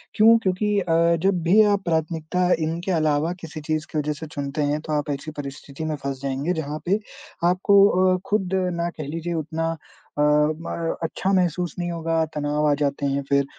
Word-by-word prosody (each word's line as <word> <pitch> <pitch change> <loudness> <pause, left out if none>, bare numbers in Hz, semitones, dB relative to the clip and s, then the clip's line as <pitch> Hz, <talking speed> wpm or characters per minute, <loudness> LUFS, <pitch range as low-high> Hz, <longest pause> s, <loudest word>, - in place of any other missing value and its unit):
क्यों? 225 +2 +7
क्योंकि 205 +2 +1
अ, 170 -2 +3
जब 190 -2 +2
भी 195 +6 +5
आप 200 -1 -1
प्राथमिकता 165 +2 0
इनके 165 +4 -2
अलावा 155 0 +1
किसी 160 -1 -7
चीज़ 155 +1 -2
के 155 - -3
वजह 150 +1 -1
से 150 +2 -8
चुनते 145 +1 -3
हैं, 145 +1 0
तो 155 -1 -4
आप 150 -1 -1
ऐसी 140 +3 -5
परिस्थिति 140 +2 -8
में 155 - -1
फँस 135 -1 -3
जाएँगे 140 +5 -1
जहाँ 150 +1 -5
पे 200 +4 +2 0.5
आपको 200 +2 +5 0.3
अ, - - -1
खुद 200 -3 +1 0.3
ना 170 - 0
कह 155 - -5
लीजिए 165 +3 -4
उतना 165 +1 -2 0.5
अ, - - +4
म 155 +3 +1
अच्छा 185 +4 -1
महसूस 175 -2 0
नहीं 175 0 -2
होगा, 165 -1 0
तनाव 150 +1 0
आ 145 - +4
जाते 140 0 0
हैं 140 0 0
फिर। 140 0 +3
160 Hz, 190 wpm, -23 LUFS, 150-175 Hz, 0.5 s, क्यों